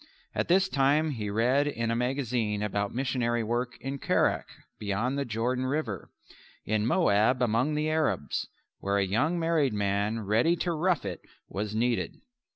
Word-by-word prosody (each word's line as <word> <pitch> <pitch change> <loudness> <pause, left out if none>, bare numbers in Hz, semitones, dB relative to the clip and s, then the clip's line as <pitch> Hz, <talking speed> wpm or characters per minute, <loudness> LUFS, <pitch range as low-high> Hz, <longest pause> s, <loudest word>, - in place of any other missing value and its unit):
At - - -1
this 190 +2 +4
time 150 0 +2
he 110 -6 -3
read 125 +7 +2
in 115 -5 -1
a - - +1
magazine 120 -4 -1
about 100 -1 -1
missionary 120 -2 0
work 120 +2 -2
in 135 +1 -4
Kerak - - +1 0.3
beyond 105 +6 -1
the 140 0 -1
River - - -16
Jordan 125 - -1 0.6
in 110 +1 +1
Moab 125 - +3
among 125 +5 +1
the 150 +1 0
Arabs 155 - 0 0.3
where 100 +1 0
a 100 - +2
young 140 - +1
married 165 -6 +2
man 105 +2 0
ready 115 - +2
to 175 +1 -1
rough 170 - +1
it 90 -3 -4 0.3
was 105 +1 -3
needed. 120 +1 0
120 Hz, 160 wpm, -28 LUFS, 105-145 Hz, 0.6 s, this